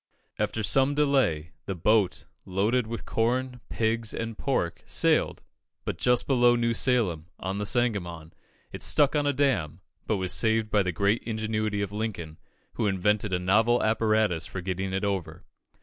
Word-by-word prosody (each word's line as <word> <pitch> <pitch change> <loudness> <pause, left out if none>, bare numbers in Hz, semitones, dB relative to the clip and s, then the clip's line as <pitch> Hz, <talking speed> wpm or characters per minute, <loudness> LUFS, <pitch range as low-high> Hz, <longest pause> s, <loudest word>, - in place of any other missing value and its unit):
After 110 - -1
some 135 +7 +2
delay, 130 - +1 0.2
the 95 - -2
boat, 100 +2 +1 0.2
loaded 110 +6 0
with 115 0 -6
corn, 125 +2 -1
pigs, 110 0 -1
and 115 -1 -4
pork, 105 -10 -2
sailed, - - +1 0.4
but - - -4
just 125 -1 +2
below 120 -3 +4
New 115 -1 +1
Salem, 105 -11 0
on 95 +2 -3
the 105 - -2
Sangamon, 90 -10 -1 0.4
it - - -8
stuck 145 0 +4
on 145 -1 +1
a - - +3
dam, 125 - 0 0.3
but 110 - +1
was 95 -1 -1
saved 110 -1 +1
by 105 - +4
the 90 -1 -1
great 100 +6 +1
ingenuity 110 -2 -2
of 100 - -5
Lincoln, 105 -8 -5 0.3
who 110 - -1
invented 105 +1 0
a 90 - +1
novel 110 +7 +2
apparatus 110 -6 +1
for 95 - -6
getting 95 +1 -3
it 95 +2 -2
over. 90 -4 -3
110 Hz, 165 wpm, -27 LUFS, 95-120 Hz, 0.4 s, below